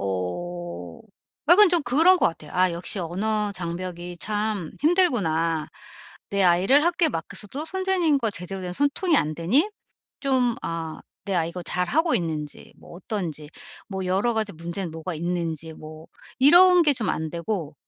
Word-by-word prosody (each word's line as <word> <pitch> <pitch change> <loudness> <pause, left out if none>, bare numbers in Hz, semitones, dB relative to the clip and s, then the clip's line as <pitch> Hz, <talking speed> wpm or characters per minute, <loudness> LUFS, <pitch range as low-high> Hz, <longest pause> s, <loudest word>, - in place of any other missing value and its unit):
어 90 -2 -5 0.5
약간 400 +2 +8
좀 345 -3 +3
그런 320 +9 +5
것 - - +4
같아요. 165 - -10
'아 185 0 +3
역시 175 +4 -3
언어 205 +5 -1
장벽이 175 0 -5
참 210 -5 -2
힘들구나. 185 - +2 0.6
내 200 -1 +1
아이를 190 - +4
학교에 345 -1 +2
맡겼어도 200 - -5
선생님과 345 - +1
제대로 190 0 -7
된 180 - -4
소통이 295 - +1
안 155 - 0
되니 240 - +2 0.5
좀 255 -3 +1
아 165 -1 -5 0.3
내 200 - -2
아이가 170 +1 -1
잘하고 265 - 0
있는지 155 -4 -4
뭐 - - -15
어떤지 170 -6 -5 0.4
뭐 190 -2 -4
여러 200 +6 +1
가지 215 -2 -1
문제는 170 +2 -5
뭐가 165 +2 -5
있는지 165 -1 -3
뭐' 155 +1 -11 0.3
이런 350 +6 +7
게 295 -3 +4
좀 225 -6 -3
안 160 -1 -3
되고. 170 -3 -4
185 Hz, 285 characters per minute, -24 LUFS, 165-265 Hz, 0.6 s, 약간